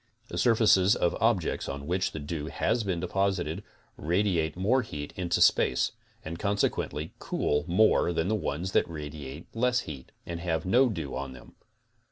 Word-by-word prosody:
The - - -5
surfaces 105 -5 +5
of 85 - +1
objects 110 -7 +1
on 70 +1 -5
which 90 +4 0
the - - -7
dew 75 0 -4
has 115 +7 0
been 95 -4 -1
deposited 95 -1 -1 0.3
radiate 85 -1 0
more 115 +8 +3
heat 75 - -7
into 90 -2 0
space, 65 - +4 0.3
and 85 +2 -5
consequently 100 -6 -1
cool 75 0 0
more 90 0 +4
than 80 0 0
the 110 - +1
ones 90 -3 -2
that - - +2
radiate 75 -1 -7
less 125 +1 +2
heat 70 -4 -9
and 85 -1 -5
have 80 -2 -1
no 125 +7 +4
dew 80 - -4
on 70 -1 -4
them. 60 - -14
85 Hz, 165 wpm, -28 LUFS, 75-100 Hz, 0.3 s, surfaces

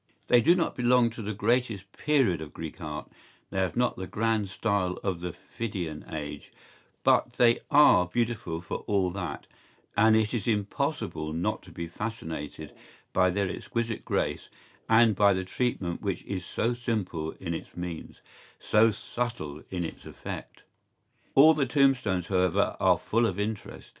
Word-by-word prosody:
¬Ý - - -48 0.2
They 120 - +6
do 170 +8 +5
not 175 - 0
belong 125 -1 +4
to 115 - -8
the 105 0 -3
greatest 110 -3 0
period 135 - +2
of 75 - -9
Greek 80 +2 -7
art, 75 -1 -6 0.4
they 95 - -1
have 95 +3 -1
not 125 0 +1
the 95 - -5
grand 110 -2 0
style 100 -3 0
of 90 -4 -2
the 90 0 -3
Phidian 90 -8 -6
age, 75 -2 -6 0.5
but - - +3
they 120 -1 +4
are 140 -12 +6
beautiful 110 -5 -2
for 85 - -4
all 95 -3 +2
that, 90 -6 -5 0.5
and 110 0 +5
it 110 0 +2
is 115 -3 -2
impossible 105 - -1
not 85 +2 -1
to - - -15
be 85 - -5
fascinated 80 -5 -6 0.4
by 95 0 +4
their 100 +1 0
exquisite 115 +4 -3
grace - - -1 0.4
and 110 -1 +6
by 100 0 +5
the 95 0 -2
treatment 95 -5 -2
which 100 -3 -2
is 95 -2 -4
so 115 +6 -1
simple 105 -10 -2
in 85 -3 -3
its 80 - -7
means, 90 -2 -6 0.4
so 110 +1 +4
subtle 110 -9 -4
in 90 -2 -2
its 80 - -7
effect.¬Ý - - -8 0.7
All 155 +4 +8
the 140 -3 0
tombstones, 130 - +2
however, 90 -2 +2
are - - +4
full 115 +1 +1
of 100 -1 -3
interest. 105 0 -4
100 Hz, 165 wpm, -28 LUFS, 90-115 Hz, 0.7 s, All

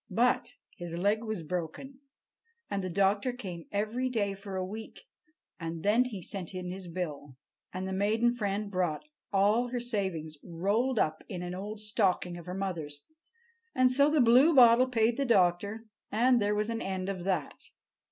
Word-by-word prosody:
But 240 +3 +1 0.2
his 170 -2 -6
leg 205 +5 +1
was 215 -6 -4
broken; 180 - -5 0.7
and 195 -1 -1
the 185 - -2
doctor 200 +6 +2
came 185 -9 -8
every 220 +5 -1
day 205 -5 0
for 195 0 -8
a 185 0 -1
week, 220 +4 -8 0.6
and 165 -1 -5
then 225 +5 +4
he 205 -8 -6
sent 185 -1 -5
in 180 -1 -4
his 185 0 -7
bill. 150 -6 -5 0.3
And 185 +1 -4
the 190 - -3
maiden 220 +5 +2
friend 205 -3 -2
brought 180 -5 -1 0.3
all 205 +5 +3
her 245 0 -3
savings 190 -10 -3
rolled 205 +9 0
up 155 -5 0
in 180 -2 -5
an 175 0 -4
old 205 +3 -5
stocking 195 -4 0
of 175 -1 -10
her 180 - -4
mother's. 160 -7 -4 0.7
And 255 0 +4
so 280 +3 +4
the 300 -2 +3
Bluebottle 250 0 +7
paid 230 -1 +2
the 280 - +1
doctor, 200 0 +2 0.3
and 240 +2 +3
there 205 0 +1
was 210 +2 -1
an 230 0 -3
end 190 -1 -3
of 190 -3 -4
that. 180 -7 -2
200 Hz, 170 wpm, -30 LUFS, 180-230 Hz, 0.7 s, Bluebottle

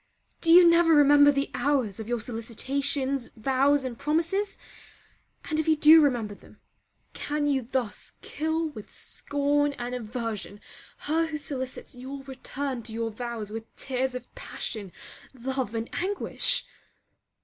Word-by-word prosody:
Do 330 - +3
you 350 +1 +9
never 335 -1 +5
remember 290 0 +7
the 275 0 -1
hours 250 -5 0
of 220 +1 -6
your 240 -1 0
solicitations, 260 +4 -2
vows, 270 +4 +2
and 240 -3 -5
promises? 335 +7 0 0.9
and 310 -1 -1
if 315 - -1
you 315 - +5
do 310 +1 +8
remember 240 -8 +1
them, - - -18 0.5
can 295 0 -2
you 270 -5 0
thus 250 -5 -3
kill 320 +1 -1
with 215 -9 -11
scorn 290 0 0
and 245 -2 -5
aversion 225 -3 -5 0.5
her 325 +2 +1
who 310 -1 -4
solicits 260 -3 -5
your 270 +2 -7
return 270 -1 -5
to 225 0 -7
your 225 0 -2
vows 225 -2 -5
with 225 +1 -8
tears 260 -1 -2
of 250 -1 -8
passion, 215 - -5 0.4
love, 260 -2 -3
and 225 +1 -2
anguish? 390 +3 0
270 Hz, 140 wpm, -27 LUFS, 235-295 Hz, 0.9 s, you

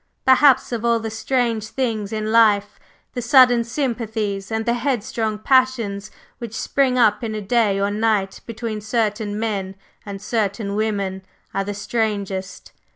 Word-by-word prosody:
Perhaps 260 0 +5
of 235 -2 -3
all 235 -1 +2
the 225 0 -5
strange 230 -1 -1
things 220 -5 -2
in 215 0 -2
life, 210 -3 +3 0.3
the 245 - -3
sudden 245 -1 +5
sympathies 225 -5 -3
and 220 0 -1
the 235 - +2
headstrong 230 -3 -2
passions 230 -4 +1 0.3
which 230 -2 -7
spring 265 -2 +1
up 215 -2 +3
in 220 -1 -3
a - - -2
day 205 -1 +1
or 200 - +1
a 200 - -1
night 210 -2 0
between 220 -1 -5
certain 215 -1 -1
men 200 -4 -3 0.3
and 200 -1 -7
certain 205 -1 -2
women 200 -3 -2 0.3
are 195 - 0
the 205 +1 -5
strangest. 200 -3 -3
220 Hz, 155 wpm, -21 LUFS, 205-235 Hz, 0.3 s, Perhaps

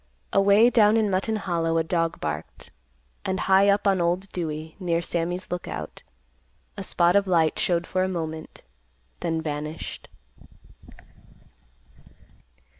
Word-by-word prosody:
Away 200 +4 +5
down 215 -2 +5
in 215 -2 +1
Mutton 195 +4 0
Hollow 170 -5 -1
a 165 - +2
dog 165 0 -1
barked, 75 0 -6 0.5
and 190 0 -2
high 195 +1 +4
up 200 +1 +2
on 195 -3 +3
Old 180 +3 -1
Dewey 160 -2 -5
near 170 -3 0
Sammy's 175 +1 -3
Lookout, 180 0 -5 0.7
a 200 - -6
spot 175 -1 +2
of 200 -1 +3
light 165 -4 +2
showed 175 -1 +1
for 185 - -1
a 185 - +1
moment, 160 -3 -5 0.6
then 165 -2 -2
vanished. 150 +1 -5
175 Hz, 125 wpm, -25 LUFS, 165-195 Hz, 0.7 s, Away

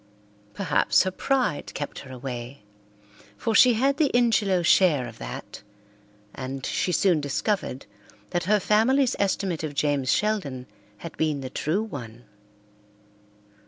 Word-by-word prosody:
Perhaps 165 -7 +2
her 185 - -2
pride 255 - -1
kept 145 - -5
her 135 - -11
away, 125 -1 -7 0.7
for 225 - -1
she 245 +2 +6
had 275 +5 +1
the 305 -4 +3
Ingelow 215 -7 +2
share 160 -6 +4
of 115 - -12
that, - - -8 0.7
and 135 0 -6
she 180 - -1
soon 175 -3 +2
discovered 145 - -2 0.5
that 175 - -1
her 210 +3 +3
family's 240 +7 +2
estimate 190 -4 -1
of 150 -2 -4
James 140 -2 +1
Sheldon 185 -13 -1 0.3
had 165 - -9
been 155 -3 0
the 130 -1 -6
true 170 +11 -1
one. 120 - -8
165 Hz, 130 wpm, -25 LUFS, 135-210 Hz, 0.7 s, she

